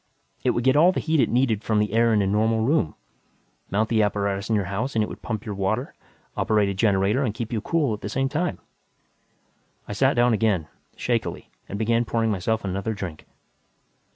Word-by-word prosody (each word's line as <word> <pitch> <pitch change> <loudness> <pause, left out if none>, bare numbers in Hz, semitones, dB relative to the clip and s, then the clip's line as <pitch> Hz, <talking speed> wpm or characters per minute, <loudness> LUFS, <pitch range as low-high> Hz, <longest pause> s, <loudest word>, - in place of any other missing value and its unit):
It - - +2
would 120 - 0
get 130 +2 +4
all 170 +5 +6
the - - -2
heat 160 -1 +1
it - - +3
needed 120 -4 +1
from 110 -1 +1
the 105 0 +1
air 115 +1 +4
in 105 -2 +3
a - - 0
normal 110 +3 +2
room. 120 - +1 0.7
Mount 110 +3 +1
the 110 -2 +3
apparatus 100 0 -1
in 110 - +2
your 100 -2 0
house 110 +8 -3
and 110 - +3
it - - -2
would - - -9
pump 110 -3 -4
your 105 - -4
water, 100 +6 -2 0.4
operate 105 -2 +2
a - - -1
generator 100 +3 +2
and 110 -6 -1
keep 115 0 -4
you 110 - -1
cool 150 -6 0
at 105 - -6
the - - -4
same 135 0 0
time!" 160 +6 -1 1.3
I - - -4
sat - - +2
down 120 0 +4
again, 105 -7 +1 0.3
shakily, - - -2 0.2
and 100 - -4
began 115 +2 +2
pouring 115 -1 0
myself 105 +3 -1
another 100 +3 -2
drink. 90 -6 -7
110 Hz, 210 wpm, -24 LUFS, 100-120 Hz, 1.3 s, all